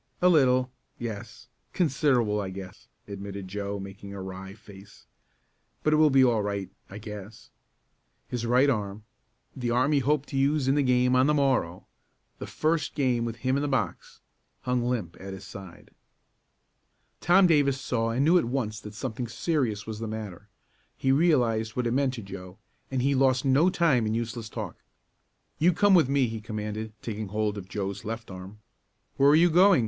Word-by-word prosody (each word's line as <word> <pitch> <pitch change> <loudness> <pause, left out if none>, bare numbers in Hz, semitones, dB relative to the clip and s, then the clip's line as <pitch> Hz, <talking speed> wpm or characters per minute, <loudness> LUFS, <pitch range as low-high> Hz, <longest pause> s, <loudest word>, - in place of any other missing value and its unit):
"A 180 - +5
little 130 -5 +3 0.3
yes; 110 0 -7 0.3
considerable 130 - +1
I 95 - -4
guess," 95 0 -10 0.2
admitted 100 -1 -7
Joe, 100 +1 -4
making 100 +1 -9
a - - -6
wry 95 +1 -8
face. 100 -2 -15 0.8
"But 155 - +3
it - - +4
will 155 0 +5
be 135 -1 +5
all 115 -3 +2
right 100 -2 -3 0.2
I 95 - -8
guess." 105 0 -10 0.8
His 120 -2 -4
right 125 +4 +4
arm 105 -5 -2 0.5
the 125 -3 -3
arm 125 +5 +2
he 145 - +4
hoped 145 +1 0
to 135 - -3
use 140 0 +2
in 135 - +4
the 145 - +2
game 125 -1 +3
on 130 +2 +4
the 150 - +3
morrow 130 - 0 0.5
the - - -6
first 155 -2 -1
game 125 -5 +1
with 115 -1 -4
him 130 +1 +2
in - - -1
the 145 - -1
box 135 -2 -3 0.4
hung 125 -1 0
limp 105 -9 -3
at 95 0 -7
his 95 0 -9
side. 95 -3 -11 1.3
Tom 185 +3 +5
Davis 145 -5 +3
saw 115 -3 -1
and 125 +5 +1
knew 175 +3 +5
at - - -1
once 115 -4 -2
that 105 0 -10
something 120 +1 -4
serious 115 - -1
was 110 -1 -6
the 115 - -4
matter. 105 -3 -7 0.5
He 135 - +1
realized 120 -8 +2
what 125 - -1
it 120 - 0
meant 135 +1 +1
to 115 - -7
Joe, 95 -1 -9 0.3
and 130 -2 -1
he 140 +1 +2
lost 130 0 +2
no 140 +7 +4
time 145 -11 +2
in 110 - -1
useless 115 -1 -4
talk. 105 -7 -6 0.8
"You 170 +4 +5
come 205 +3 +4
with 165 -8 +5
me!" 140 -1 +3
he 110 -1 -5
commanded, 105 0 -5
taking 110 -2 -4
hold 105 +1 -1
of 95 -2 -8
Joe's 100 -1 -4
left 115 0 -6
arm. 95 +3 -10 0.6
"Where 140 +1 +5
are 145 - +6
you 170 +2 +5
going?" 185 +1 +6
120 Hz, 185 wpm, -27 LUFS, 105-135 Hz, 1.3 s, are